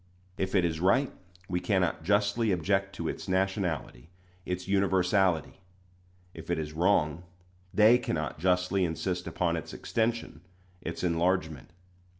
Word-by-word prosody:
If 95 +1 -2
it 90 -3 +4
is 80 -2 -1
right, 125 +10 +3 0.4
we 90 -1 -1
cannot 90 -5 0
justly 100 +4 +2
object 95 +2 0
to - - -4
its - - -5
nationality 95 - -1 0.4
its 90 0 -3
universality; 95 -3 +1 0.7
if - - -11
it 85 - +1
is 75 -1 -4
wrong, 80 -2 +2 0.5
they 110 +5 +6
cannot 75 - -3
justly 90 +2 +2
insist 90 +2 -2
upon 85 -2 0
its 80 - -6
extension 115 -9 -2 0.4
its - - -5
enlargement. 85 -4 0
90 Hz, 130 wpm, -29 LUFS, 85-100 Hz, 0.7 s, they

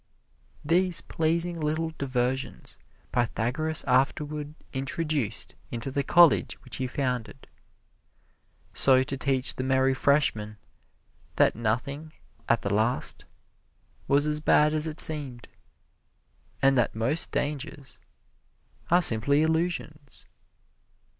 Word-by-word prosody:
These 180 +3 +1
pleasing 170 +2 -1
little 160 +2 -2
diversions 130 -1 -3 0.3
Pythagoras 125 +7 -1
afterward 145 +3 -1 0.2
introduced 135 -3 -3 0.2
into 120 +3 -5
the 140 - -1
college 170 -1 +4
which 125 - -4
he 130 - -3
founded, 125 -1 -4 1.3
so 130 -1 +4
to 135 - -5
teach 135 -1 +1
the 130 - -3
merry 130 0 +1
freshmen 130 -7 0 0.8
that - - +3
nothing, 140 +8 -3 0.4
at 115 -1 +1
the 100 - -2
last, 110 +4 -1 0.8
was 140 +1 +2
as 150 0 -2
bad 150 0 +3
as 155 +1 +1
it 155 -1 -7
seemed, 140 -7 +5 1.2
and 135 0 +4
that 120 -4 0
most 130 +9 0
dangers 145 -2 -5 0.9
are 175 +1 +4
simply 140 +5 +4
illusions. 160 -3 -3
140 Hz, 105 wpm, -26 LUFS, 125-155 Hz, 1.3 s, seemed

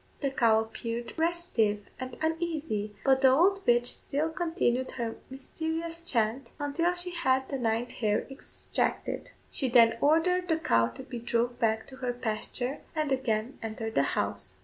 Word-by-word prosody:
The 275 -2 0
cow 225 -4 +4
appeared 230 +1 -5
restive 320 - 0
and 255 -1 -6
uneasy, 315 -11 -2
but 265 -1 +4
the 265 - +7
old 365 +9 +4
witch 240 0 +4
still 290 +5 -2
continued 320 -7 0
her 235 -3 -3
mysterious 320 +5 -4
chant 230 -3 0
until 335 +5 0
she 355 0 0
had 265 -6 +2
the 275 - -2
ninth 230 0 0
hair 210 -2 0
extracted. 270 - -3 0.2
She 265 - 0
then 230 -1 +5
ordered 360 +5 +3
the 320 - +2
cow 115 - +3
to 115 - -9
be 240 - -6
drove 235 +1 -1
back 220 -2 +1
to 260 - -12
her 250 -2 -2
pasture, 245 +3 -2 0.2
and 305 -2 0
again 245 -1 -1
entered 225 0 -4
the - - +4 0.2
house. - - -2
260 Hz, 160 wpm, -29 LUFS, 230-320 Hz, 0.2 s, the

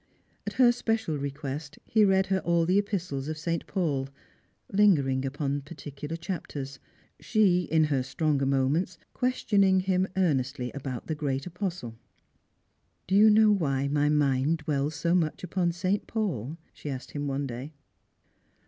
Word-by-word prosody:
At - - -2
her 245 -2 +6
special 225 -8 -1
request 140 +1 -5
he 215 -1 +3
read 190 -1 +4
her 190 0 +1
all 170 -2 +1
the 185 +4 +3
epistles 180 -9 -3
of 155 0 -4
St. 170 +1 -3
Paul, 145 -8 -1 0.6
lingering 145 -11 +3
upon 140 +1 -2
j^articular 145 +1 -7
chapters; 145 -7 -5 0.4
she, 185 -6 +2
in 160 0 +4
her 145 -4 +1
stronger 140 +1 0
moments, 140 +7 +1 0.2
questioning 200 -7 +2
him 185 0 +1
earnestly 135 -7 0
about 135 -3 -6
the 160 - -2
great 140 -3 -2
apostle. 175 - -5 0.5
" - - -46
Do 190 - -2
you 210 +2 +7
know 215 0 +6
why 140 -8 +1
my 145 0 +2
mind 145 +1 +2
dwells 145 0 -1
so 170 +3 0
much 165 -2 0
upon 180 -1 0
St. 185 +4 -1
Paul 165 - -2
?" - - -38
she 150 - -7
asked 130 -2 -6
him 145 -1 -3
one 140 +1 -1
day. 130 +4 -6
155 Hz, 155 wpm, -28 LUFS, 140-185 Hz, 0.6 s, you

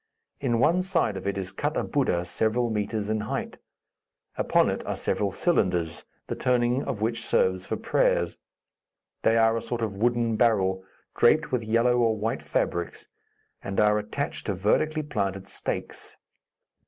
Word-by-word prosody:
In 120 -4 0
one 165 +9 +3
side 180 - +1
of 95 0 -5
it 100 0 -1
is 95 -1 -4
cut 145 +7 -2
a - - 0
Buddha 90 - 0
several 110 +6 0
metres 105 0 -2
in 110 0 0
height. 105 +1 -4 0.8
Upon - - +3
it - - -4
are - - -1
several 100 -1 0
cylinders, 90 - 0 0.2
the - - -4
turning 125 +1 +1
of 105 - -4
which 115 +1 0
serves 95 0 +1
for - - -2
prayers. - - +1 0.9
They 115 - +3
are 115 0 +4
a 115 - -1
sort 120 0 -3
of 105 -3 -2
wooden 120 0 +1
barrel, 95 -5 +2 0.3
draped 155 +5 +3
with 125 -3 0
yellow 115 +3 +2
or 115 -2 +2
white 110 +2 -2
fabrics, 85 -1 -2 0.6
and 100 - -2
are 105 0 +4
attached 110 +7 -4
to 100 - 0
vertically 155 - +1
planted 100 -8 -3
stakes. - - -5
110 Hz, 160 wpm, -26 LUFS, 100-120 Hz, 0.9 s, are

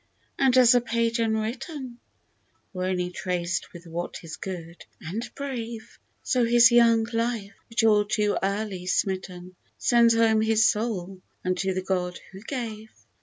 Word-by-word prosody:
and 260 -2 +4
as 250 -2 +7
a 245 - +4
page 230 0 0
unwritten, 235 +4 -3 0.7
Or 185 -1 -3
only 180 -1 -1
traced 175 -1 -3
with 175 0 -12
what 170 +2 -6
is 165 -1 -7
good 170 -3 -8 0.2
and 215 +9 -5
brave, 235 -5 -6 0.2
So 250 -1 +1
his 235 0 +6
young 230 -1 +5
life, 230 -3 -2 0.2
which 230 0 0
all 210 -2 +5
too 210 -1 0
early 195 -2 -2
smitten, 185 -1 -2 0.2
Sends 235 -1 +4
home 225 -1 +3
his 220 +1 +3
soul 195 -4 -1 0.2
unto 185 +1 0
the 185 - -2
God 180 -2 -2
who 190 +1 -11
gave. 220 -3 -5
220 Hz, 145 wpm, -26 LUFS, 185-235 Hz, 0.7 s, as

